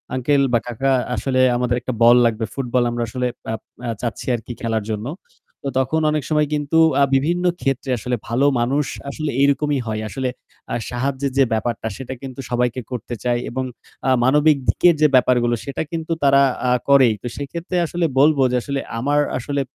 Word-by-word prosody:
"Uncle 140 Hz, +2 st, +2 dB
বা 120 Hz, -, +4 dB
কাকা, 135 Hz, +3 st, 0 dB, 0.2 s
আসলে 130 Hz, -1 st, -1 dB, 0.2 s
আমাদের 125 Hz, 0 st, 0 dB
একটা 130 Hz, -, -3 dB
বল 120 Hz, +1 st, +8 dB
লাগবে 115 Hz, -1 st, 0 dB
ফুটবল 125 Hz, -2 st, 0 dB
আমরা 120 Hz, 0 st, -2 dB
আসলে 125 Hz, +3 st, -2 dB, 0.3 s
আপ 110 Hz, -, -5 dB, 0.3 s
আ -, -, -2 dB
চাচ্ছি 115 Hz, -4 st, -4 dB
আরকি 120 Hz, +1 st, -7 dB
খেলার 110 Hz, -2 st, -1 dB
জন্য।" 105 Hz, +2 st, -3 dB, 0.6 s
তো 140 Hz, -, -2 dB
তখন 155 Hz, +5 st, 0 dB
অনেক 150 Hz, -2 st, -1 dB
সময় 150 Hz, -1 st, +2 dB
কিন্তু 145 Hz, +2 st, 0 dB, 0.2 s
আ -, -, +7 dB
বিভিন্ন 170 Hz, +6 st, +1 dB, 0.2 s
ক্ষেত্রে 135 Hz, -1 st, -1 dB
আসলে 125 Hz, +3 st, -2 dB
ভালো 125 Hz, +5 st, +1 dB
মানুষ 135 Hz, +4 st, +1 dB, 0.2 s
আসলে 150 Hz, +1 st, -3 dB
এরকমই 140 Hz, 0 st, +2 dB
হয়। 110 Hz, 0 st, -2 dB
আসলে 130 Hz, +6 st, -2 dB, 0.4 s
আ -, -, 0 dB
সাহায্যের 135 Hz, +2 st, -2 dB
যে 135 Hz, -, +6 dB
ব্যাপারটা 110 Hz, 0 st, -2 dB
সেটা 130 Hz, -1 st, -6 dB
কিন্তু 135 Hz, -1 st, -8 dB
সবাইকে 125 Hz, +1 st, 0 dB
করতে 120 Hz, 0 st, -5 dB
চায় 120 Hz, -1 st, +1 dB
এবং 130 Hz, +2 st, -3 dB, 0.4 s
আ -, -, +3 dB
মানবিক 150 Hz, +3 st, +4 dB
দিকের 175 Hz, -2 st, +4 dB
যে 150 Hz, -, +7 dB
ব্যাপারগুলো 120 Hz, -1 st, +3 dB
সেটা 140 Hz, -, -4 dB
কিন্তু 165 Hz, 0 st, -4 dB
তারা 140 Hz, 0 st, +5 dB, 0.3 s
আ -, -, +3 dB, 0.2 s
করেই। 130 Hz, -5 st, +6 dB
তো 120 Hz, -, -5 dB
সেক্ষেত্রে 170 Hz, +5 st, -4 dB
আসলে 170 Hz, +1 st, -1 dB
বলব 150 Hz, +1 st, +5 dB
যে -, -, +1 dB
আসলে 140 Hz, -1 st, -2 dB, 0.2 s
আমার 145 Hz, +4 st, +1 dB, 0.2 s
আসলে 140 Hz, +3 st, -2 dB
130 Hz, 180 wpm, -20 LUFS, 120-145 Hz, 0.6 s, বল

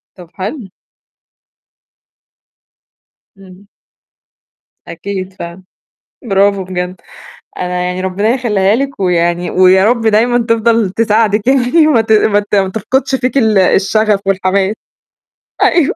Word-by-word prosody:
طب 180 Hz, -3 st, -14 dB
حلو. 205 Hz, +4 st, -6 dB, 2.7 s
إمم. 190 Hz, 0 st, -16 dB, 1.2 s
أكيد 190 Hz, +2 st, -6 dB
فعلًا. 175 Hz, +1 st, -9 dB, 0.6 s
برافو 195 Hz, -2 st, +1 dB
بجد. 180 Hz, 0 st, -5 dB, 0.6 s
أنا 180 Hz, 0 st, -3 dB
يعني 180 Hz, +1 st, -3 dB
ربنا 190 Hz, +3 st, -1 dB
يخلّيها 215 Hz, -5 st, +1 dB
لِك 275 Hz, 0 st, -4 dB
ويعني 175 Hz, -1 st, 0 dB
ويا 185 Hz, +1 st, +4 dB
رب 235 Hz, +1 st, +1 dB
دايمًا 225 Hz, +2 st, +2 dB
تفضل 230 Hz, -2 st, +1 dB
تساعدِك 215 Hz, +1 st, 0 dB
يعني 270 Hz, +4 st, +3 dB
وما 260 Hz, -7 st, +3 dB
ت 220 Hz, 0 st, -5 dB
ما 210 Hz, -1 st, +3 dB
ت 205 Hz, 0 st, -3 dB
ما 195 Hz, -1 st, +1 dB
تفقدش 260 Hz, +7 st, -1 dB
فيكِ 255 Hz, +1 st, -2 dB
ال 220 Hz, -5 st, +2 dB
الشغف 205 Hz, +2 st, +2 dB
والحماس. 195 Hz, +1 st, 0 dB, 0.9 s
أيوه. 335 Hz, -5 st, +2 dB
205 Hz, 115 wpm, -13 LUFS, 185-230 Hz, 2.7 s, ويا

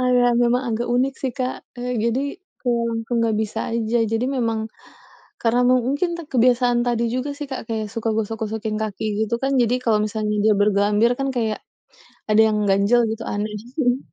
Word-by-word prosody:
agak 250 Hz, -1 st, +3 dB
agak 240 Hz, 0 st, +3 dB
emang 250 Hz, +2 st, +1 dB
agak 235 Hz, +2 st, -2 dB
unik 265 Hz, +2 st, +1 dB
sih 260 Hz, -2 st, -1 dB
Kak, 255 Hz, 0 st, -1 dB, 0.2 s
eee, 250 Hz, +1 st, -3 dB
jadi 235 Hz, +3 st, +1 dB, 0.4 s
kalau 240 Hz, -2 st, 0 dB, 0.2 s
aku 240 Hz, -, -9 dB
nggak 225 Hz, -2 st, +1 dB
bisa 220 Hz, +1 st, -4 dB, 0.2 s
aja, 230 Hz, 0 st, 0 dB, 0.2 s
jadi 225 Hz, +2 st, +1 dB
memang 225 Hz, -2 st, 0 dB, 0.8 s
karena 240 Hz, +1 st, +3 dB
mu 255 Hz, -, +5 dB
mungkin 315 Hz, +6 st, 0 dB, 0.2 s
kebiasaan 245 Hz, -1 st, +3 dB
tadi 235 Hz, -1 st, +1 dB
juga 255 Hz, +3 st, -2 dB
sih 295 Hz, -, -4 dB
Kak, 265 Hz, -, -3 dB
kayak 220 Hz, -2 st, -2 dB
suka 230 Hz, 0 st, -2 dB
gosok-gosokin 220 Hz, 0 st, -3 dB
kaki 215 Hz, 0 st, -4 dB, 0.2 s
gitu 235 Hz, -, -2 dB
kan 275 Hz, +1 st, +1 dB
jadi 235 Hz, +1 st, +2 dB
kalau 220 Hz, -3 st, +3 dB
misalnya 215 Hz, 0 st, -2 dB
dia 215 Hz, -1 st, +5 dB
bergelambir 205 Hz, +3 st, +3 dB
kan 275 Hz, 0 st, -1 dB
kayak 220 Hz, -3 st, 0 dB, 0.7 s
ada 215 Hz, +1 st, +5 dB
yang 215 Hz, -, 0 dB
ganjel 200 Hz, +5 st, +4 dB
gitu, 225 Hz, +1 st, -5 dB
aneh. 210 Hz, +1 st, -2 dB, 0.2 s
Mhm 245 Hz, -4 st, +3 dB
mhm. 255 Hz, -, -4 dB
235 Hz, 185 wpm, -22 LUFS, 220-250 Hz, 0.8 s, mu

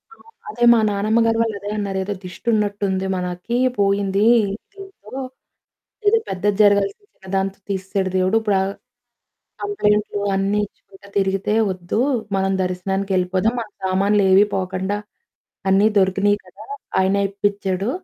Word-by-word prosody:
అవును. 455 Hz, -, -21 dB, 0.2 s
అదే 240 Hz, +3 st, -3 dB
మా 230 Hz, -, +4 dB
నానమ్మగారు 225 Hz, +3 st, +2 dB
వాళ్లు 225 Hz, -2 st, 0 dB
అదే 205 Hz, +1 st, -6 dB
అన్నారు. 200 Hz, -2 st, -2 dB
"ఏదో 205 Hz, -, -2 dB
దిష్టి 180 Hz, +5 st, -11 dB
ఉన్నట్టుంది. 200 Hz, -2 st, 0 dB
మనకి 180 Hz, +6 st, -3 dB, 0.2 s
పోయింది 200 Hz, 0 st, +2 dB, 0.5 s
దీంతో. 390 Hz, -, -13 dB, 1.0 s
ఏదో 455 Hz, +2 st, +5 dB
పెద్దది 195 Hz, +2 st, 0 dB
జరగాల్సింది, 200 Hz, -, +2 dB
చిన్నదాంతో 190 Hz, +1 st, -3 dB
తీసేసాడు 190 Hz, 0 st, -2 dB
దేవుడు. 185 Hz, +4 st, +2 dB
ఇప్పుడు 205 Hz, -3 st, +1 dB
ఆ -, -, 0 dB, 1.0 s
కంప్లెయింట్లు 210 Hz, -, 0 dB, 0.2 s
అన్నీ 195 Hz, +2 st, +1 dB
ఇచ్చుకుంటా 200 Hz, 0 st, -19 dB
తిరిగితే 195 Hz, +2 st, 0 dB, 0.2 s
వద్దు. 180 Hz, +3 st, -2 dB, 0.4 s
మనం 195 Hz, 0 st, +1 dB
దర్శనానికెళ్లిపోదాం, 190 Hz, +3 st, 0 dB
మన 220 Hz, -, -6 dB, 0.2 s
సామాన్లు 200 Hz, +2 st, +2 dB
ఏవీ 195 Hz, +2 st, +7 dB
పోకుండా, 190 Hz, +2 st, -2 dB, 0.7 s
అన్నీ 195 Hz, +3 st, +5 dB
దొరికినాయి 195 Hz, +2 st, +2 dB
కదా! -, -, -14 dB, 0.4 s
ఆయనే 200 Hz, +1 st, +2 dB
ఇప్పిచాడు" 200 Hz, 0 st, -1 dB
200 Hz, 125 wpm, -21 LUFS, 190-210 Hz, 1.0 s, ఏవీ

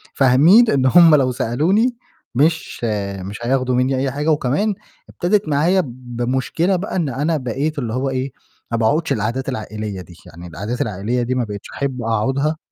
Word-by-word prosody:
فاهمين 155 Hz, -, +5 dB
إن 135 Hz, -2 st, +2 dB
هُم 165 Hz, +3 st, +7 dB
لو 130 Hz, -3 st, +2 dB
سألوني 185 Hz, -, +1 dB, 0.4 s
مش 155 Hz, 0 st, 0 dB, 0.4 s
مش 100 Hz, +3 st, -7 dB
هياخدوا 130 Hz, +1 st, +1 dB
مني 130 Hz, +1 st, +1 dB
أي 135 Hz, 0 st, -1 dB
حاجة، 145 Hz, +4 st, -2 dB
وكمان 150 Hz, +9 st, +1 dB, 0.4 s
ابتدت 200 Hz, +4 st, 0 dB
معايا 165 Hz, +6 st, +2 dB
بمشكلة 130 Hz, +8 st, -2 dB
بقى 185 Hz, +4 st, -4 dB
إن 165 Hz, -6 st, 0 dB
أنا 150 Hz, +5 st, -1 dB
بقيت 140 Hz, +4 st, -2 dB
اللي 115 Hz, -4 st, -3 dB
هو 130 Hz, +2 st, -1 dB
إيه، 130 Hz, 0 st, -3 dB, 0.4 s
ما 115 Hz, -, 0 dB
باقعدش 145 Hz, +7 st, +1 dB
القعدات 120 Hz, +4 st, -2 dB
العائلية 110 Hz, -5 st, -5 dB
دي، 90 Hz, -, -14 dB
يعني 85 Hz, +1 st, -11 dB
القعدات 105 Hz, +9 st, -5 dB
العائلية 110 Hz, +4 st, -1 dB
دي 125 Hz, +2 st, -1 dB
ما 125 Hz, -, 0 dB
بقيتش 105 Hz, -2 st, -7 dB
أحب 135 Hz, -3 st, -3 dB
أقعدها 135 Hz, +7 st, 0 dB
130 Hz, 165 wpm, -19 LUFS, 120-155 Hz, 0.4 s, هُم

